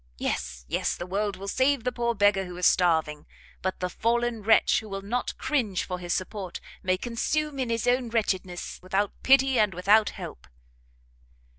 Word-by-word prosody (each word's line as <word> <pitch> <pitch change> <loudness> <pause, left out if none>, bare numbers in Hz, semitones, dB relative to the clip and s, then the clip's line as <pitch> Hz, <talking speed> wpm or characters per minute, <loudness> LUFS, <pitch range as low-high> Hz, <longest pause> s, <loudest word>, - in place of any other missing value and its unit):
Yes, 60 -1 -3
yes, - - -1
the 175 - -6
world 200 +2 -1
will 195 +1 -8
save 260 +3 +2
the 250 - 0
poor 235 -1 -1
beggar 205 -2 +3
who 180 -1 -8
is 180 - 0
starving; 160 -4 +2 0.3
but 190 0 -3
the 180 - 0
fallen 235 +4 0
wretch, 220 +2 +4
who 220 - -10
will 195 0 -5
not 240 +5 -2
cringe 225 - 0
for 180 -1 -5
his 175 -1 -5
support, 185 0 -3 0.2
may 185 0 +1
consume 275 +7 -2
in 255 -2 -1
his 230 0 -1
own 245 -1 +2
wretchedness 190 -6 -2
without 195 +2 0
pity 265 -1 +4
and 210 -4 +2
without 205 +4 +4
help!" - - -9
205 Hz, 175 wpm, -27 LUFS, 185-240 Hz, 0.3 s, wretch